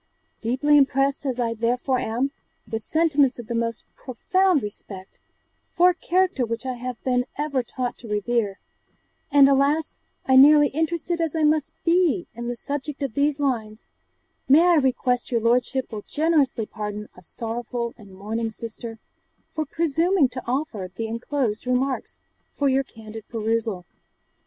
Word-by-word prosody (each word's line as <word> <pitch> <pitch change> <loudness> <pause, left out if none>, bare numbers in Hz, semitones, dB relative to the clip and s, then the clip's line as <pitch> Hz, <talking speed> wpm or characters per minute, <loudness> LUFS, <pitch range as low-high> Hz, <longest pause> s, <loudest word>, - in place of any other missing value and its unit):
Deeply 265 +6 +3
impressed 275 +1 +1
as 255 -2 -2
I 230 -1 0
therefore 245 +3 0
am, 250 +4 -1 0.4
with 225 -1 -3
sentiments 295 -1 +2
of 240 - -8
the 235 - -4
most 230 0 -2
profound 360 - +1
respect 195 -2 -8 0.5
for 360 +1 +4
a - - -5
character 365 -4 +1
which 230 +2 -3
I 260 - -2
have 245 -1 -6
been 250 -1 +1
ever 290 -3 0
taught 250 0 -4
to 235 - -10
revere, 210 -1 -1 0.7
and 280 -1 +7
alas 280 +3 +2 0.3
I 260 0 +5
nearly 295 +1 +7
interested 335 +3 -1
as 330 -1 -1
I 320 - +1
must 305 -1 +1
be 335 - +3
in 235 +1 -6
the 245 - -2
subject 285 +3 -4
of 270 - -3
these 285 +2 +1
lines, 225 -6 -2 0.6
may 300 +5 +7
I 345 - +5
request 255 -2 +1
your 235 -2 +1
lordship 245 +3 +1
will 215 -2 -5
generously 295 -5 +1
pardon 210 -1 -6
a 180 - -14
sorrowful 235 +4 -4
and 205 -4 -15
mourning 220 +4 -3
sister, 225 +1 -7 0.5
for 310 -1 -2
presuming 330 0 +2
to 255 0 -6
offer 240 -8 -2
the 225 - -3
enclosed 230 0 -2
[remarks] 255 +1 -1 0.3
for 285 - 0
your 270 0 +2
candid 220 -3 -11
perusal. 225 -4 -2
255 Hz, 155 wpm, -24 LUFS, 230-290 Hz, 0.7 s, and